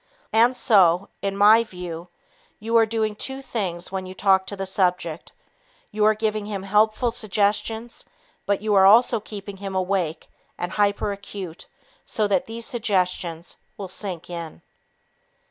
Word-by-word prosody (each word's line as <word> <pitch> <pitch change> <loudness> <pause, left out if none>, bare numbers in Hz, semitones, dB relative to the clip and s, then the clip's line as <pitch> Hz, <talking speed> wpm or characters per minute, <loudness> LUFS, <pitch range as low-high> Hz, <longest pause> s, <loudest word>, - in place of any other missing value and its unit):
And 235 +3 +4
so, 190 -5 +4
in 195 0 -2
my 215 +3 +7
view, 180 -5 -8 0.5
you 225 +2 -2
are 225 -1 +6
doing 220 -1 -1
two 265 +5 -5
things 185 -10 -4
when 190 -1 -4
you 185 - -9
talk 190 -1 +3
to 200 - -4
the 195 -1 -4
subject; 180 -4 -1 0.6
you 210 0 0
are 215 0 +5
giving 215 -1 -2
him 200 -2 -4
helpful 215 +4 +2
suggestions, 220 +1 -1 0.4
but 200 0 0
you 215 -1 +1
are 190 -1 +7
also 230 +2 +6
keeping 200 -1 -8
him 195 0 -6
awake 185 -4 -1 0.3
and 175 +1 -3
hyperacute 200 -3 -2 0.4
so 215 - -1
that 195 -3 +1
these 230 +1 -7
suggestions 185 - -2 0.2
will 195 - -6
sink 180 -2 -5
in. 170 -3 -7
200 Hz, 145 wpm, -23 LUFS, 185-215 Hz, 0.6 s, my